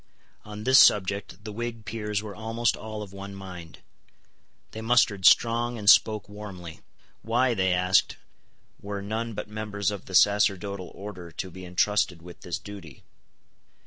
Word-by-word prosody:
On 105 0 -8
this 130 +2 +6
subject 100 0 +3
the 105 - -6
Whig 115 0 -5
peers 105 0 -3
were 105 -2 -7
almost 115 +1 -1
all 110 -1 -7
of 100 -2 -11
one 100 0 -8
mind. 90 -4 -10 0.9
They 110 - -7
mustered 110 -5 +3
strong, 120 +1 +3
and 105 -2 -7
spoke 105 -1 +5
warmly. 100 -5 -9 0.4
Why, 120 +3 +1
they 95 -3 +1
asked, 90 +1 +2 0.6
were 100 -1 -5
none 110 +2 -4
but - - -5
members 105 -1 -3
of 100 -2 -7
the 95 - -6
sacerdotal 100 -1 +2
order 95 -4 -8
to 95 - -6
be 95 +1 -10
intrusted 90 -1 0
with 90 0 -12
this 85 - -4
duty? 95 -9 -11
105 Hz, 150 wpm, -26 LUFS, 95-110 Hz, 0.9 s, this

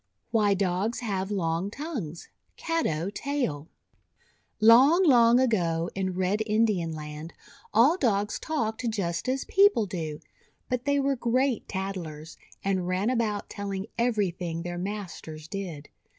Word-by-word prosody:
WHY 210 -3 +3
DOGS 195 +5 -1
HAVE 195 -4 -2
LONG 175 -2 -1
TONGUES 220 - -6 0.3
Caddo 200 - -1
Tale 245 - -2 0.9
LONG, 260 - +7
long 240 -4 +6
ago 175 -9 +1
in 190 -1 -2
Red 190 +3 0
Indian 210 -6 +1
Land, 150 +1 -7 0.4
all 255 - +5
Dogs 210 - 0
talked 230 -6 -2
just 195 -1 -2
as 265 +1 -1
people 395 - +4
do. 160 -6 -5 0.5
But 250 -1 -2
they 285 0 +2
were 275 0 +1
great 250 0 0
tattlers, 175 -5 -5 0.3
and 190 -2 0
ran 185 +6 +1
about 220 -4 -1
telling 200 -1 -4
everything 180 -8 0
their 175 0 -4
masters 175 -5 -6
did. 170 -7 -6
200 Hz, 125 wpm, -27 LUFS, 175-235 Hz, 0.9 s, LONG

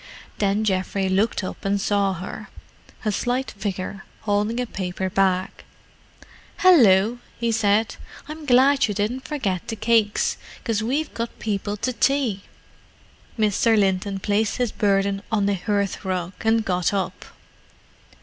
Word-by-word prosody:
Then 205 +1 +1
Geoffrey 190 -1 0
looked 200 +2 +1
up 185 - -6
and 200 0 +1
saw 200 -1 +1
her—a 190 +4 -8
slight 245 +5 -1
figure, 195 -1 -5 0.2
holding 210 +3 0
a 250 - 0
paper 190 -3 -4
bag. 190 -1 +2 1.1
"Hallo!" 235 - +5 0.2
he 235 -1 0
said. 220 0 +1 0.3
"I'm 305 0 -8
glad 270 +2 +5
you 205 - -3
didn't 225 +6 -2
forget 195 - -2
the 225 - -3
cakes, 220 -1 +2 0.3
'cause 225 -3 0
we've 275 +8 -1
got 230 0 -4
people 205 -1 -3
to 255 +5 -2
tea!" 255 -6 +1 1.0
Mr. 220 +1 +3
Linton 195 0 +1
placed 205 +2 0
his 245 -3 0
burden 195 -1 +1
on 205 -3 +2
the 200 - +2
hearthrug, 190 -2 -2
and 225 0 +2
got 180 0 0
up. 185 -2 -3
205 Hz, 130 wpm, -23 LUFS, 195-230 Hz, 1.1 s, Hallo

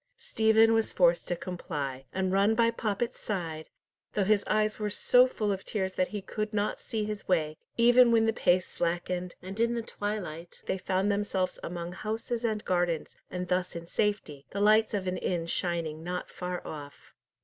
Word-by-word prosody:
Stephen 225 - +4
was 225 -1 +2
forced 175 -2 +3
to 175 - 0
comply, 145 -7 -5
and 190 0 -1
run 200 +3 +4
by 230 0 +4
Poppet's 230 0 -2
side, 165 -6 -4 0.4
though 205 - +2
his 205 +1 +3
eyes 215 0 +1
were 210 -1 -1
so 250 +4 +5
full 215 -4 -1
of 195 -1 -3
tears 190 -3 -2
that 185 -1 +1
he 205 -2 -5
could 215 +2 -3
not 205 0 0
see 220 -2 -3
his 210 -1 -5
way, 155 -4 +1 0.2
even 240 +1 +6
when 225 -1 +4
the 225 - +2
pace 180 -3 +3
slackened, 175 +1 -2
and 190 +3 -7
in 235 +1 +2
the 235 - -2
twilight 185 -7 -5
they 190 - -1
found 190 +2 +1
themselves 200 -2 -1
among 170 0 -5
houses 225 +4 -3
and 215 -2 -1
gardens, 175 -3 0
and 180 0 -4
thus 180 0 0
in 170 0 -6
safety, 170 -8 -2
the 200 - -4
lights 215 +1 +4
of 195 -2 -2
an 185 0 -1
inn 170 -2 -1
shining 165 -2 -2
not 180 +1 -4
far 180 0 -5
off. 145 -2 -9
190 Hz, 185 wpm, -29 LUFS, 175-215 Hz, 0.4 s, even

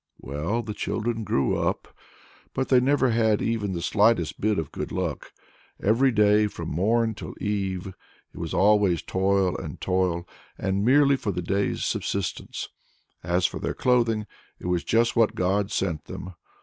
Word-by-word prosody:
Well, 80 - -2
the 105 -1 -5
children 115 +2 -2
grew 70 -9 +1
up, - - -2 0.6
but 130 - -1
they 130 - +6
never 135 0 +2
had 110 -2 +2
even 105 -4 -1
the 85 -1 -4
slightest 105 -6 +2
bit 105 -1 +2
of 80 -3 -3
good - - -5
luck. - - -3 0.5
Every 120 +6 +3
day, 105 -1 +4
from 85 -5 -6
morn 110 +8 +1
till 105 - -8
eve, 95 -3 -2 0.5
it - - -10
was 85 -2 -4
always 100 -4 +3
toil 95 -1 +1
and - - -6
toil, 90 -2 0 0.3
and 95 0 -1
all 100 - 0
merely 140 +2 +5
for 105 - -2
the 90 -1 -4
day's 100 +3 -1
subsistence. 100 -2 -3 0.5
As 90 +1 +1
for - - -1
their - - -3
clothing, 115 -4 +2 0.3
it - - -12
was 90 -1 0
just 115 +1 +2
what 115 -2 +3
God 95 +2 +1
sent 85 -8 -2
them! 95 0 -8
105 Hz, 165 wpm, -25 LUFS, 90-115 Hz, 0.6 s, they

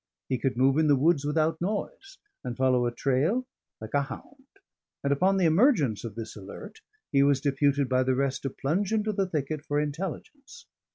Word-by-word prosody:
He 130 -2 0
could 135 -3 -1
move 135 +3 +3
in 160 - +3
the 145 - +5
woods 145 +1 +2
without 155 +2 0
noise, 380 - -4 0.3
and 125 -1 -5
follow 130 -2 +2
a - - -1
trail 140 - 0 0.3
like 110 0 -9
a 145 - +3
hound; 265 - -10 0.6
and 140 0 +2
upon 190 +7 +2
the 185 - +2
emergence 160 - +3
of 115 -4 -7
this 115 -1 -7
alert, 105 - -10 0.3
he 140 - +4
was 140 -1 +3
deputed 140 0 +1
by 130 0 +2
the 130 0 +1
rest 135 0 -1
to 135 - -2
plunge 170 +11 -2
into 215 -1 0
the 195 -1 0
thicket 155 -3 -3
for 145 -1 -1
intelligence. 195 - -6
145 Hz, 190 wpm, -27 LUFS, 130-190 Hz, 0.6 s, the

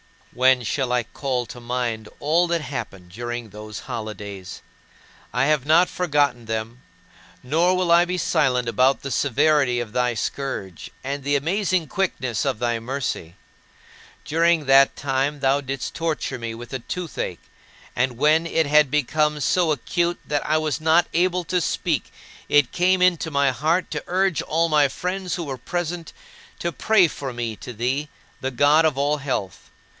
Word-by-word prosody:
12. - - -23
When 130 0 +4
shall 125 +5 -1
I 125 -1 +2
call 125 +2 -3
to 120 - -10
mind 120 -2 -3
all 165 +4 +2
that 170 -1 0
happened 95 -11 -6
during 120 +2 -5
those 105 0 -8
holidays? 100 -4 -7 0.7
I 125 +4 +1
have 150 -2 +2
not 165 +4 +5
forgotten 145 -8 0
them; 110 +2 -4 0.6
nor 165 +8 +2
will 180 -2 +1
I 170 +1 +6
be 180 +1 -2
silent 130 -7 +1
about 130 +4 +2
the 135 - -4
severity 140 -1 +2
of 120 -3 -5
thy 125 0 0
scourge, 105 -6 -4
and 140 +1 -4
the 145 +1 +1
amazing 180 +4 0
quickness 130 - -1
of - - 0
thy 120 0 -1
mercy. 115 -9 -4 0.9
During 165 0 +2
that 135 0 +5
time 140 +1 -1
thou 135 +1 +2
didst 135 -1 -4
torture 165 -5 -2
me 115 -1 -5
with 120 +3 -10
a 130 - -2
toothache; 150 - -4 0.6
and 125 -1 0
when 155 +4 +3
it 160 -1 +1
had 150 0 +4
become 150 +2 +1
so 170 +2 +2
acute 170 +5 -1
that 145 -1 -1
I 155 +1 +3
was 155 0 -1
not 160 +2 +4
able 180 +1 +1
to 180 +2 0
speak, 160 -5 -1 0.4
it 145 -4 +4
came 185 +1 +2
into 175 -3 +3
my 140 -2 +2
heart 160 +7 0
to - - -3
urge 185 -3 +1
all 165 +2 0
my 150 -2 +4
friends 180 +4 -3
who 175 - -4
were 135 -4 -5
present 175 +4 -4 0.5
to 170 - -2
pray 195 +2 +4
for 140 -4 -6
me 120 -2 -3
to 125 - -8
thee, 130 +6 -1 0.3
the 130 - -2
God 145 +5 +4
of 155 -4 +1
all 145 +2 +1
health. 130 -10 -4
140 Hz, 170 wpm, -23 LUFS, 120-165 Hz, 0.9 s, I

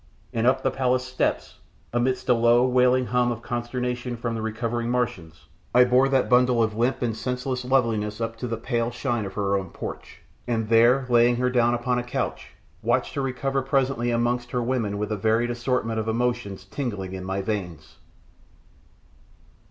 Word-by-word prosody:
And 115 +1 +1
up 130 +1 +2
the - - +2
palace 130 -1 0
steps, 130 0 -2 0.3
amidst 125 +2 0
a 125 - +5
low, 120 +1 +4
wailing 125 0 +3
hum 125 +2 +1
of 115 -1 -6
consternation 125 0 -3
from 115 0 -3
the 115 - -3
recovering 115 +1 -2
Martians, 90 -10 -3 0.3
I 125 - +8
bore 125 +2 +4
that 135 -1 +2
bundle 125 -1 +4
of 110 -1 -1
limp 120 +3 0
and 115 -2 -1
senseless 125 +2 -3
loveliness 115 -5 0
up 115 0 -2
into 115 +2 -5
the 115 -1 -3
pale 115 0 -1
shine 120 -2 -2
of 95 -1 -7
her 100 -1 0
own 95 -2 -2
porch, - - -8 0.2
and 115 -3 -1
there, 120 +4 +5
laying 120 0 +4
her 125 +1 0
down 120 -1 +3
upon 125 +1 0
a - - -3
couch, 120 - -4 0.3
watched - - 0
her 140 - -2
recover 135 +1 -1
presently 135 -3 0
amongst 120 +1 0
her 125 0 -1
women 115 -5 -1
with 105 +1 -3
a 105 - -1
varied 115 +4 +1
assortment 120 -2 -1
of 110 - -3
emotions 120 -3 -2
tingling 100 -9 -4
in 95 -1 -6
my 95 +1 -3
veins. 90 -8 -5
120 Hz, 180 wpm, -25 LUFS, 110-125 Hz, 0.3 s, I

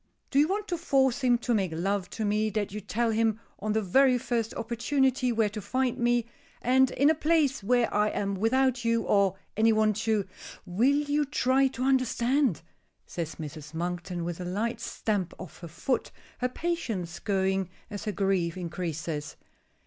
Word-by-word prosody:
Do 275 - +3
you 295 - +5
want 410 +3 -2
to 345 -2 -2
force 270 -5 +2
him 245 -1 +4
to 240 0 -1
make 195 -6 +1
love 195 +2 -1
to 220 - -3
me, 210 +1 +1
that 205 -1 -2
you 210 +1 -5
tell 225 +3 0
him 220 0 +1 0.2
on 210 +1 -1
the 220 0 +1
very 255 +7 +4
first 235 -2 -1
opportunity 255 +2 +1
where 225 -2 +2
to 210 +1 -6
find 255 +4 -1
me, 240 -1 +2 0.3
and 260 +1 +4
in 280 - +2
a - - +3
place 305 -4 +2
where 245 +2 +2
I 210 +1 +3
am 200 -1 -2
without 245 +5 +1
you, 230 -1 +2
or 200 -2 +3 0.2
any 225 +1 +4
one 215 -1 +3
to 215 -1 0 0.2
" - - -14
"Will 245 - +6 0.2
you 295 +1 +2
try 270 -1 +2
to 255 -1 -4
understand?" 255 - +2 0.4
says 165 -2 -5
Mrs. 155 0 -8
Monkton, 175 +1 -3
with 175 +1 -4
a - - -3
light 215 +6 -2
stamp 205 -6 -2
of 185 - -10
her 170 - -8
foot, 230 - -2 0.3
her 250 - 0
patience 235 - -3
going 190 -2 0 0.2
as 205 +1 -6
her 210 - 0
grief 190 -4 0
increases. 165 -3 -4
220 Hz, 180 wpm, -28 LUFS, 190-255 Hz, 0.4 s, Will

